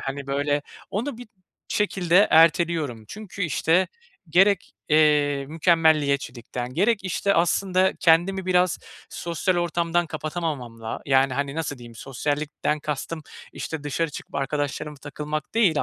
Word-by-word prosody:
Hani, 135 Hz, +1 st, -5 dB
böyle 145 Hz, +1 st, 0 dB, 0.3 s
onu 235 Hz, +4 st, -3 dB
bir 245 Hz, -, -10 dB, 0.4 s
şekilde 195 Hz, -2 st, +3 dB
erteliyorum. 160 Hz, -7 st, +3 dB
Çünkü, 200 Hz, -, -7 dB
işte, 170 Hz, +3 st, +2 dB, 0.4 s
gerek, 195 Hz, +5 st, +3 dB, 0.2 s
eee, 150 Hz, -2 st, +3 dB
mükemmeliyetçilikten 145 Hz, -7 st, +1 dB
gerek, 205 Hz, +5 st, +2 dB
işte, 200 Hz, +2 st, 0 dB
aslında 185 Hz, +2 st, +2 dB
kendimi 180 Hz, +3 st, +3 dB
biraz 180 Hz, -2 st, +2 dB, 0.3 s
sosyal 175 Hz, +2 st, -1 dB
ortamdan 170 Hz, 0 st, 0 dB
kapatamamamla, 145 Hz, -8 st, -4 dB
yani, 135 Hz, -1 st, +3 dB
hani, 140 Hz, +1 st, -2 dB
nasıl 150 Hz, -4 st, -3 dB
diyeyim? 120 Hz, -1 st, -12 dB
Sosyallikten 145 Hz, +4 st, -2 dB
kastım, 155 Hz, +2 st, -4 dB, 0.3 s
işte, 160 Hz, -2 st, -5 dB
dışarı 150 Hz, +2 st, -1 dB
çıkıp -, -, -10 dB
arkadaşlarıma 145 Hz, +1 st, -2 dB
takılmak 150 Hz, +4 st, -5 dB
değil 190 Hz, -10 st, +3 dB
155 Hz, 120 wpm, -24 LUFS, 145-175 Hz, 0.4 s, şekilde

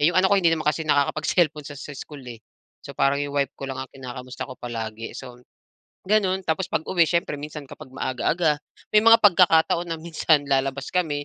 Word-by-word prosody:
'Yong 160 Hz, +5 st, +3 dB
anak 190 Hz, -, +4 dB
ko 200 Hz, -, +5 dB
hindi 170 Hz, -, +4 dB
naman 160 Hz, -1 st, -1 dB
kasi 150 Hz, +2 st, +1 dB
nakakapag-cellphone 150 Hz, +1 st, +1 dB
sa 145 Hz, -, -8 dB, 0.2 s
school 145 Hz, 0 st, -9 dB
eh. 120 Hz, -2 st, -9 dB, 0.4 s
So -, -, -8 dB
parang 140 Hz, +1 st, +2 dB
'yong 145 Hz, 0 st, -4 dB
wife 140 Hz, -1 st, 0 dB
ko 135 Hz, -, -6 dB
lang 135 Hz, -, -5 dB
ang 130 Hz, -, -7 dB
kinakamusta 125 Hz, 0 st, -8 dB
ko 130 Hz, -, -8 dB
palagi. 115 Hz, -2 st, -6 dB
So 125 Hz, -1 st, -10 dB, 0.7 s
gano'n, 195 Hz, -2 st, +2 dB
tapos 165 Hz, +3 st, -1 dB
pag-uwi 170 Hz, +2 st, +2 dB
siyempre 170 Hz, -4 st, 0 dB
minsan 150 Hz, 0 st, -7 dB
kapag 130 Hz, -, -12 dB
maaga-aga, 150 Hz, +4 st, 0 dB, 0.4 s
may 210 Hz, -, +8 dB
mga 230 Hz, 0 st, +8 dB
pagkakataon 175 Hz, -3 st, +4 dB
na 165 Hz, -, -2 dB
minsan 160 Hz, -2 st, +1 dB
lalabas 135 Hz, 0 st, 0 dB
kami, 150 Hz, -5 st, 0 dB
150 Hz, 185 wpm, -24 LUFS, 135-170 Hz, 0.7 s, may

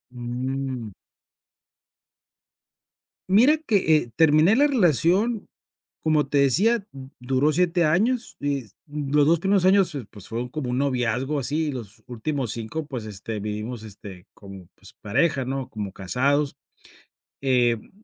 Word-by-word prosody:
Mm. 125 Hz, -1 st, -4 dB, 2.4 s
Mira 245 Hz, +11 st, +5 dB
que, 200 Hz, -, +2 dB
eh, 120 Hz, -6 st, -3 dB
terminé 160 Hz, +5 st, +5 dB
la 285 Hz, +4 st, +4 dB
relación 200 Hz, -, +2 dB, 0.6 s
como 155 Hz, -2 st, +2 dB
te 140 Hz, 0 st, +1 dB
decía, 195 Hz, -, +3 dB
d 135 Hz, -1 st, -11 dB
duró 130 Hz, +4 st, +1 dB
7 175 Hz, +1 st, +2 dB
años, 225 Hz, +10 st, +1 dB
eh, 140 Hz, -5 st, -2 dB, 0.2 s
los 145 Hz, 0 st, +1 dB
2 165 Hz, +1 st, +4 dB
primeros 195 Hz, +1 st, +2 dB
años, 190 Hz, -2 st, +4 dB
fu 140 Hz, -4 st, -5 dB
pues 105 Hz, -4 st, -9 dB
fueron 120 Hz, +2 st, -4 dB
como 140 Hz, -2 st, -4 dB
un 125 Hz, -, -1 dB
noviazgo 130 Hz, +1 st, 0 dB
así 150 Hz, +4 st, -1 dB
y -, -, -2 dB
los 120 Hz, -7 st, -9 dB
últimos 125 Hz, 0 st, -3 dB
5, 115 Hz, +8 st, -5 dB
pues, 125 Hz, -7 st, -6 dB
este, 110 Hz, +1 st, -6 dB
vivimos 105 Hz, +3 st, -5 dB
este, 100 Hz, -3 st, -11 dB
como 95 Hz, -3 st, -12 dB
pues -, -, -11 dB
pareja, 130 Hz, +5 st, +1 dB
¿no? 135 Hz, 0 st, -4 dB
Como 105 Hz, -3 st, -5 dB
casados, 135 Hz, +9 st, 0 dB, 0.9 s
em, 120 Hz, -4 st, +1 dB
135 Hz, 135 wpm, -24 LUFS, 120-160 Hz, 2.4 s, Mira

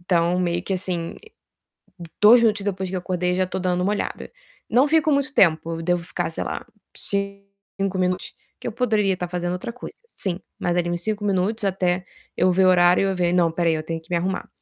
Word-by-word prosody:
Então, 175 Hz, 0 st, +1 dB
meio 175 Hz, -1 st, 0 dB
que, 195 Hz, -, -4 dB
assim, 180 Hz, -3 st, -1 dB, 1.1 s
2 230 Hz, +3 st, +8 dB
minutos 215 Hz, -3 st, +2 dB
depois 190 Hz, -2 st, -2 dB
que 190 Hz, -, -4 dB
eu -, -, -1 dB
acordei, 180 Hz, 0 st, -1 dB
já 185 Hz, 0 st, +1 dB
tô 190 Hz, -, -4 dB
dando 180 Hz, -1 st, 0 dB
uma 195 Hz, -, +1 dB
olhada. 210 Hz, -, -4 dB, 0.4 s
Não 255 Hz, +6 st, +4 dB
fico 315 Hz, 0 st, +3 dB
muito 280 Hz, -1 st, +1 dB
tempo, 165 Hz, -, +2 dB
devo 175 Hz, 0 st, 0 dB
ficar, -, -, -3 dB
sei -, -, -3 dB
lá, -, -, -5 dB, 0.3 s
ci 200 Hz, 0 st, 0 dB, 0.4 s
5 195 Hz, -1 st, -1 dB
minutos, 185 Hz, 0 st, -1 dB, 0.3 s
que -, -, -6 dB
eu -, -, -2 dB
poderia 215 Hz, -4 st, +1 dB
estar 180 Hz, -1 st, -4 dB
fazendo 175 Hz, 0 st, -3 dB
outra 230 Hz, +6 st, -5 dB
coisa, 250 Hz, -, -10 dB
sim, 190 Hz, -, -3 dB, 0.2 s
mas 175 Hz, 0 st, 0 dB
ali 175 Hz, -1 st, 0 dB
em 175 Hz, -, 0 dB
5 210 Hz, +3 st, -3 dB
minutos 200 Hz, +3 st, 0 dB
até 180 Hz, -1 st, 0 dB, 0.3 s
eu 185 Hz, -, +3 dB
ver 185 Hz, +1 st, +3 dB
o -, -, +6 dB
horário 180 Hz, +1 st, +4 dB
eu 190 Hz, -, -1 dB
ver: 175 Hz, -1 st, +1 dB
"Não, 175 Hz, -2 st, +3 dB
espera 165 Hz, +1 st, 0 dB
aí, 160 Hz, -, +2 dB
eu 155 Hz, -, -3 dB
tenho 165 Hz, +1 st, -4 dB
que 160 Hz, -, -25 dB
me 175 Hz, -, +2 dB
arrumar". 185 Hz, +2 st, -2 dB
185 Hz, 220 wpm, -23 LUFS, 175-200 Hz, 1.1 s, 2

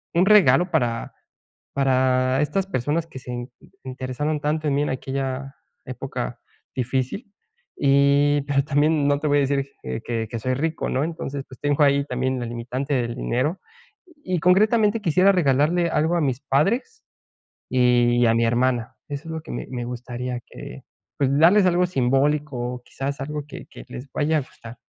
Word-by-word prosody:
un 180 Hz, +2 st, +4 dB
regalo 190 Hz, -3 st, +5 dB
para 120 Hz, -7 st, -1 dB, 0.6 s
para 130 Hz, 0 st, +2 dB
estas 165 Hz, +6 st, 0 dB
personas 150 Hz, +3 st, -1 dB
que 130 Hz, -, -9 dB
se 125 Hz, -1 st, -6 dB, 0.4 s
interesaron 130 Hz, +4 st, -3 dB
tanto 155 Hz, +1 st, -1 dB
en 140 Hz, -, +1 dB
mí 145 Hz, -, +2 dB
en -, -, -1 dB
aquella 135 Hz, +1 st, -4 dB, 0.3 s
época -, -, -5 dB, 0.4 s
difícil 130 Hz, -, -2 dB, 0.5 s
y 140 Hz, +1 st, +4 dB
pero 140 Hz, -1 st, +1 dB
también 145 Hz, 0 st, +2 dB
no 145 Hz, 0 st, +2 dB
te 155 Hz, -, -5 dB
voy 145 Hz, 0 st, +3 dB
a -, -, +3 dB
decir 140 Hz, 0 st, -1 dB, 0.2 s
que 115 Hz, -, -4 dB
que 115 Hz, -2 st, -3 dB
que 115 Hz, -, -4 dB
soy 130 Hz, +3 st, -1 dB
rico, 160 Hz, +3 st, -2 dB
¿no?, 130 Hz, +3 st, 0 dB
entonces, 145 Hz, -4 st, -4 dB
pues 130 Hz, -, -14 dB
tengo 145 Hz, +1 st, 0 dB
ahí 140 Hz, 0 st, +3 dB
también 130 Hz, 0 st, -1 dB
la 120 Hz, -, -3 dB
limitante 125 Hz, +4 st, -4 dB
del 120 Hz, -1 st, -1 dB
dinero 130 Hz, +9 st, -1 dB, 0.6 s
y 180 Hz, -2 st, -1 dB
concretamente 210 Hz, +4 st, +3 dB
quisiera 185 Hz, +4 st, +4 dB
regalarle 165 Hz, +2 st, +2 dB
algo 160 Hz, +2 st, +1 dB
a -, -, +1 dB
mis 135 Hz, -2 st, -1 dB
padres 220 Hz, -, 0 dB, 0.7 s
y 120 Hz, -1 st, +3 dB
a 115 Hz, -, +4 dB
mi 115 Hz, 0 st, +2 dB
hermana. 120 Hz, 0 st, 0 dB
Eso 145 Hz, +3 st, -6 dB
es -, -, -4 dB
lo 160 Hz, -, -4 dB
que -, -, -10 dB
me -, -, -5 dB
me 120 Hz, -2 st, -4 dB
gustaría 125 Hz, 0 st, -5 dB
que, -, -, -10 dB, 0.3 s
pues, 135 Hz, -2 st, +2 dB
darles 185 Hz, +4 st, +6 dB
algo 180 Hz, 0 st, +3 dB
simbólico 140 Hz, 0 st, +1 dB, 0.2 s
o 125 Hz, -, -11 dB
quizás 140 Hz, +1 st, -5 dB
algo 150 Hz, +1 st, -4 dB
que -, -, -9 dB
que -, -, -12 dB
les 125 Hz, +3 st, -8 dB
vaya 155 Hz, +1 st, +1 dB
a -, -, -2 dB
gustar. 115 Hz, -2 st, -12 dB
140 Hz, 175 wpm, -23 LUFS, 125-155 Hz, 0.7 s, darles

